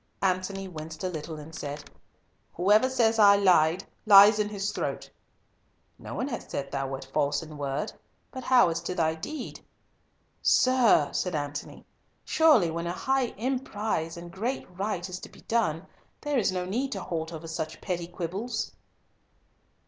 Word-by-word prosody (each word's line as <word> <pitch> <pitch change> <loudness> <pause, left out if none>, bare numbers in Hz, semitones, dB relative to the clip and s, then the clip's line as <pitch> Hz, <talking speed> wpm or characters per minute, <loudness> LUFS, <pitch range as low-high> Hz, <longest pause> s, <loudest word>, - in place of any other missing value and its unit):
Antony 190 +1 0
winced 155 -2 -8
a 185 - 0
little, 160 -1 -6
and 150 +2 -10
said, 145 -1 -6 0.7
"Whoever 210 +8 +4
says 225 -3 +2
I 200 -1 +8
lied, 180 -3 +4 0.2
lies 205 +1 +9
in 210 0 +1
his 205 0 -2
throat." - - -4 0.9
"No - - -7
one 255 - -2
hath 245 - -6
said 140 -1 -4
thou 135 -1 -2
wert 135 0 -6
false 145 +1 +1
in 155 -1 -10
word, 140 -1 -3 0.4
but 260 - -7
how 245 -8 +5
as 165 0 -2
to 180 +1 -4
thy 160 -3 +2
deed?" 250 - -7 0.8
"Sir," 250 - +4
said 180 -3 -1
Antony, 145 0 -5 0.4
"surely 295 - +4
when 170 +1 -3
a 175 - -2
high 265 +5 +1
emprise 215 -9 -2
and 170 0 -9
great 230 +9 -3
right 190 -2 -2
is 180 -1 -6
to - - -10
be - - -17
done, 190 -8 0 0.4
there 295 -3 0
is 200 -4 +1
no 180 -1 -2
need 250 +9 -2
to 195 - -5
halt 160 -1 -4
over 165 0 -7
such 160 -1 -4
petty 175 -3 -3
quibbles." 185 +7 -4
185 Hz, 165 wpm, -28 LUFS, 160-220 Hz, 0.9 s, lies